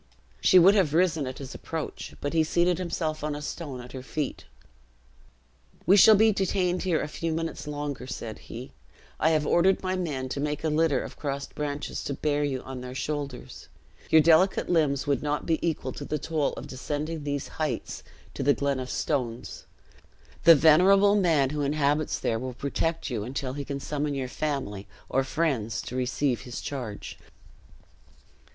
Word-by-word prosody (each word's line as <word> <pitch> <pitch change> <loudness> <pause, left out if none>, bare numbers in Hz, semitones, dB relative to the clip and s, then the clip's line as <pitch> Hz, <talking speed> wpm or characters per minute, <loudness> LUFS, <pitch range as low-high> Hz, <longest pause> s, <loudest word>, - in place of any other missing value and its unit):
She 185 - +6
would 185 +3 +8
have 180 -8 +2
risen 165 -5 +2
at 130 - -6
his 135 -1 -8
approach, 160 -2 -6
but 145 - -2
he 160 -1 +4
seated 175 +2 +2
himself 160 -4 -2
on 150 -1 -2
a - - -5
stone 145 -5 -5
at 125 - -11
her 130 - -7
feet. 140 +2 -4 1.4
"We 190 - +6
shall 215 +2 +8
be 220 +2 +5
detained 185 -2 0
here 180 -4 +1
a - - -2
few 165 +2 -3
minutes 165 -1 -3
longer," 145 -3 -4
said 115 -4 -6
he; 120 +3 -9 0.5
"I 160 - +4
have 155 -2 +2
ordered 185 +5 +3
my 185 0 0
men 150 -8 -2
to 140 - -3
make 150 +1 -2
a 160 - +1
litter 155 -1 +2
of - - -9
crossed 140 -1 -4
branches, 145 -1 -4
to 140 - -2
bear 145 0 0
you 135 -3 -2
on 130 -1 -7
their 125 0 -7
shoulders. 140 -2 -5 0.4
Your 160 - +7
delicate 170 +5 +4
limbs 150 -6 +2
would 140 -3 +1
not 150 0 -2
be 160 -2 +1
equal 165 -3 -1
to - - -7
the 150 - -2
toil 150 0 -1
of - - -7
descending 150 +4 -4
these 145 -1 -3
heights, 140 -7 -2 0.3
to - - -5
the 140 +1 +3
glen 140 -2 0
of 130 0 -5
stones. 125 -6 -3 0.8
The 165 - +10
venerable 190 +7 +6
man 160 -9 +3
who 150 -1 -2
inhabits 145 +1 +1
there 115 - -1
will 130 0 -5
protect 150 +4 -2
you 110 -4 -2
until 130 +2 -4
he 145 +1 -4
can 140 0 -4
summon 145 0 -2
your 130 -2 -2
family, 130 -9 -3 0.2
or 135 +1 +2
friends, 135 -7 -1
to 125 - -7
receive 130 0 0
his 125 -1 -6
charge." 120 -7 -6
145 Hz, 180 wpm, -27 LUFS, 135-165 Hz, 1.4 s, The